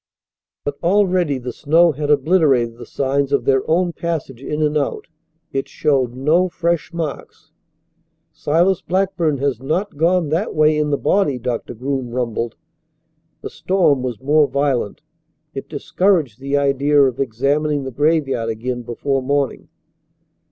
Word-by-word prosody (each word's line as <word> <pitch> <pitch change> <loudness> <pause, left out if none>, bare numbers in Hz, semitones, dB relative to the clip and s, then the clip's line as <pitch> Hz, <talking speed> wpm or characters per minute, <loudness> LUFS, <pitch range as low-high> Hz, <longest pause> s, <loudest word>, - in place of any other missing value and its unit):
But 145 0 -4
already 180 -5 +2
the 125 -1 -6
snow 165 +3 +3
had 145 0 -4
obliterated 140 -6 +3
the - - -9
signs 140 0 -1
of 140 - +1
their 135 -1 +3
own 175 +1 +2
passage 155 -8 -4
in 150 +2 -2
and 150 0 +1
out. 145 -2 -1 0.5
It 135 0 -2
showed 135 -6 0
no 160 +8 +2
fresh 170 0 -1
marks. 165 -4 -6 0.8
"Silas 170 +5 +1
Blackburn 185 -5 0
has 135 -3 -1
not 160 +6 -2
gone 170 0 +2
that 170 +9 -1
way 155 0 +4
in 150 0 0
the 145 - +1
body," 170 -8 +1
Doctor 125 -1 -4
Groom 130 +1 -3
rumbled. 120 -2 -3 0.9
The - - -7
storm 175 -8 +1
was 125 -4 -4
more 150 +2 +3
violent. 140 -7 -1 0.5
It - - -7
discouraged 165 - 0
the 140 +1 -1
idea 140 +1 +2
of 130 -3 +3
examining 140 +4 0
the 130 - -5
graveyard 140 -4 +1
again 120 +2 -3
before 130 +3 -2
morning. 140 0 -1
145 Hz, 145 wpm, -19 LUFS, 130-165 Hz, 0.9 s, way